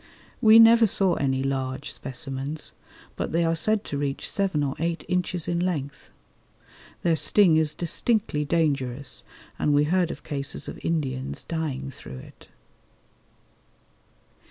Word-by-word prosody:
We 220 0 +8
never 230 0 +7
saw 190 -2 +2
any 135 -1 0
large 135 0 -3
specimens, 135 +3 -4 0.4
but - - -3
they 170 +1 +1
are 165 0 +1
said 215 +6 +1
to 140 - -4
reach 140 -1 -2
seven 190 -7 0
or 135 -1 -1
eight 170 +1 -2
inches 180 -2 -1
in 170 0 0
length 150 -6 -3 0.9
Their 170 -1 +3
sting 160 +2 +4
is 155 -1 +1
distinctly 175 -1 +1
dangerous, 140 -4 -1 0.4
and 145 - +2
we 145 - +4
heard 175 +2 +1
of - - -7
cases 140 -1 -3
of - - -7
Indians 135 -5 -2
dying 140 -5 -4
through 65 - -10
it. - - -14
150 Hz, 135 wpm, -25 LUFS, 135-175 Hz, 0.9 s, We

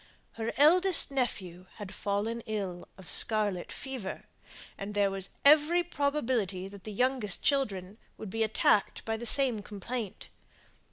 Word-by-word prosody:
Her 225 0 -4
eldest 350 +3 +4
nephew 185 -9 -3
had 205 -2 -8
fallen 210 +4 -2
ill 195 -5 -4
of 190 -3 -13
scarlet 210 -5 +1
fever, 260 -8 -6 0.5
and 205 +1 -7
there 200 -1 +2
was 195 -1 -4 0.2
every 305 +4 +6
probability 255 - -1
that 200 -1 -13
the 215 - -5
younger 250 +1 0
children 200 -2 -1 0.2
would 215 -4 -8
be 225 - -3
attacked 215 -2 +2
by 225 - -1
the 235 +2 -4
same 255 -3 +4
complaint. 210 +1 -6
215 Hz, 135 wpm, -30 LUFS, 195-260 Hz, 0.5 s, every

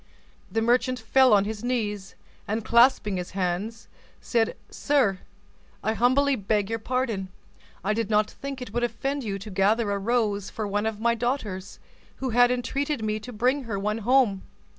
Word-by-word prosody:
The 225 - 0
merchant 250 +2 +2
fell 255 +3 +4
on 200 -1 +5
his 215 +1 -5
knees, 210 -6 -2 0.3
and 215 +1 -2
clasping 235 -4 +4
his 180 0 -5
hands, 195 +5 -2 0.3
said, 230 -2 0
"Sir, 250 -10 +1 0.6
I 220 - +1
humbly 260 +5 +3
beg 205 -1 -1
your 225 - -1
pardon: 230 -5 -2 0.6
I 205 +3 +1
did 225 -1 -2
not 210 0 +3
think 275 -2 -6
it 215 - -10
would 240 +1 0
offend 270 +4 -2
you 200 -3 -3
to 205 +2 -9
gather 205 +3 +2
a 200 - -1
rose 210 -2 0
for 215 - -4
one 205 +2 0
of 220 -2 -3
my 235 +1 +2
daughters, 225 -6 -3 0.4
who 260 -2 -3
had 245 +1 +5
entreated 255 +1 -1
me 215 0 -1
to 245 +4 -9
bring 250 +5 0
her 215 -3 -3
one 210 +3 -1
home. 230 -4 +3
225 Hz, 175 wpm, -26 LUFS, 205-250 Hz, 0.6 s, on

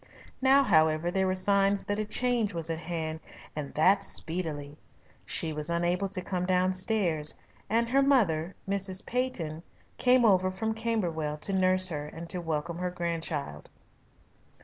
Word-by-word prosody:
Now, 270 +1 +5
however, 160 -5 +3
there 190 0 +1
were 185 - 0
signs 200 +1 +2
that 205 +1 -2
a 215 - -1
change 225 -2 0
was 165 0 -3
at 160 - -3
hand, 160 -1 -4 0.4
and 150 -2 -5
that 185 +6 +4
speedily. 155 -4 -2 0.5
She 160 -1 0
was 150 +1 0
unable 175 +3 0
to 185 -2 -2
come 180 -1 -2
downstairs, 185 -3 +1 0.3
and 230 +2 +2
her 270 +3 +3
mother, 195 - +2
Mrs. 195 -1 +1
Peyton, 195 -12 -2 0.4
came 250 -1 +4
over 185 -3 +4
from 220 +4 -2
Camberwell 175 -10 -2
to 195 - -1
nurse 185 0 +4
her 150 -3 -4
and 165 +2 -9
to 180 - -4
welcome 165 +1 -3
her 180 0 -1
grandchild. 165 - -4
180 Hz, 150 wpm, -28 LUFS, 160-200 Hz, 0.5 s, Now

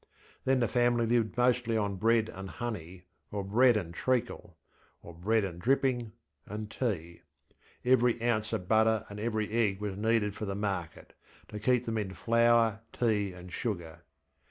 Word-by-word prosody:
Then 130 -1 +3
the 120 - +3
family 120 -1 +2
lived 115 -1 +1
mostly 120 -2 +2
on 100 -2 -1
bread 115 +2 +3
and 95 -2 -8
honey, 95 -8 -6 0.3
or 100 -1 -3
bread 120 +4 +4
and 85 -5 -4
treacle, 120 -7 -2 0.5
or 85 - -10
bread 105 +6 +1
and 90 -3 -5
dripping, 125 -3 +1 0.3
and 105 +1 -6
tea. 85 -9 -3 0.6
Every 125 -2 +4
ounce 110 -2 0
of 90 - -3
butter 110 0 +3
and 100 0 -8
every 110 -1 -2
egg 110 -4 +1
was 105 -2 -3
needed 105 0 +1
for 105 - -5
the 100 -1 -3
market, 95 -4 -4 0.4
to 105 - -6
keep 125 +2 +2
them 115 -1 -1
in 95 -2 -4
flour, 115 +1 +3
tea, 105 -5 0
and 90 0 -11
sugar. 85 -8 -4
110 Hz, 160 wpm, -30 LUFS, 100-120 Hz, 0.6 s, bread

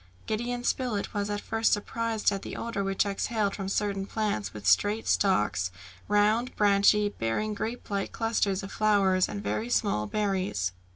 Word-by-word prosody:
Gideon 240 +3 -2
Spilett 245 -6 -1
was 205 0 -1
at 205 0 -1
first 225 0 +1
surprised 225 +1 0
at 195 -1 -3
the - - -7
odour 230 -4 -3
which 195 +1 +1
exhaled 200 +1 -1
from 195 -2 -4
certain 195 -1 -1
plants 205 - -2
with 105 0 -9
straight 210 +2 +3
stalks, 105 - +2 0.4
round 210 +4 +3
and - - -14
branchy, 205 0 +4
bearing 205 - -2
grape 225 +3 -4
like 200 -1 -1
clusters 210 -4 0
of 195 - -7
flowers 195 -3 +3
and 205 - -5
very 225 +3 -2
small 200 - +1
berries. 190 - -1
205 Hz, 165 wpm, -28 LUFS, 195-220 Hz, 0.4 s, branchy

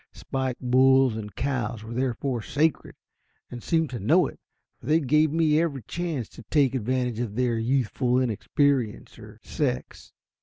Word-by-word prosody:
Spike 130 -2 -3
bulls 130 -1 +4
and 105 -3 -7
cows 120 -5 -2
were 110 +1 -8
therefore 125 0 -2
sacred, 150 +8 -1 0.6
and 120 -1 -7
seemed 160 -1 0
to 120 - -4
know 100 - +4
it, - - -8 0.4
for - - -13
they 155 +2 +4
gave 150 +1 +2
me 160 -1 +3
every 140 -7 -2
chance 165 - -4
to - - -13
take 140 -4 +3
advantage 125 -1 -1
of 115 -4 -3
their 120 -2 0
youthful 125 +1 0
inexperience 130 0 0
or - - -13
sex. - - -3
130 Hz, 155 wpm, -25 LUFS, 120-145 Hz, 0.6 s, bulls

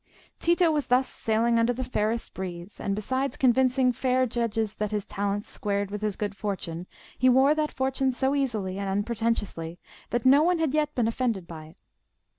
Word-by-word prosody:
Tito 340 0 +3
was 295 -2 -1
thus 255 +1 +3
sailing 230 +1 +1
under 230 +2 +2
the 260 +2 -3
fairest 230 -2 -1
breeze, 180 0 -7
and 200 - -1
besides 260 +6 -2
convincing 255 0 +3
fair 255 +1 +1
judges 225 -3 -1
that 210 -1 -1
his 210 -1 -2
talents 200 +1 -2
squared 200 -1 -2
with 210 0 -4
his 210 -2 -1
good 205 -1 -3
fortune, 180 -4 -4 0.3
he 255 - +5
wore 265 +3 +5
that 305 -1 -1
fortune 265 0 0
so 265 +2 0
easily 215 -9 -1
and 200 -1 -2
unpretentiously 205 -5 -2 0.3
that 240 0 -1
no 275 +3 +7
one 350 +2 +3
had 320 -4 0
yet 300 -1 0
been 240 -3 +2
offended 230 -5 -1
by 160 -2 -9
it. 155 - -17
230 Hz, 185 wpm, -27 LUFS, 205-260 Hz, 0.3 s, no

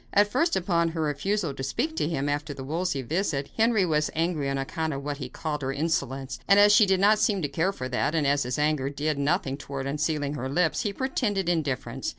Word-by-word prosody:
At 205 +1 +4
first, 330 +8 +2
upon 170 -2 +1
her 165 0 -3
refusal 155 +3 -1
to 135 - -7
speak 215 - -2
to 150 - 0
him 145 -4 -1
after 145 0 -2
the 135 - -7
Wolsey 155 -1 -2
visit 145 - -2
Henry 225 -3 +3
was 155 -2 +1
angry 160 -4 0
on 135 - -1
account 155 +3 -2
of 140 0 -5
what 145 0 -3
he 130 -3 -6
called 150 +2 -4
her 135 0 -2
insolence; 135 -3 -2
but 200 - +6
as 205 0 +7
she 210 0 +6
did 190 -1 +3
not 210 +2 +4
seem 210 -4 +1
to - - +1
care 165 +6 0
for 130 -10 -5
that, 135 +5 -1
and 155 -3 +1
as 140 +1 +2
his 125 -1 -2
anger 150 -2 +1
did 145 +1 -2
nothing 140 -2 0
toward 140 -2 -6
unsealing 150 0 -1
her 130 -2 -4
lips, 165 +3 +1
he 205 - -1
pretended 205 -6 -1
indifference. 135 -6 -1
150 Hz, 230 wpm, -26 LUFS, 140-185 Hz, -, as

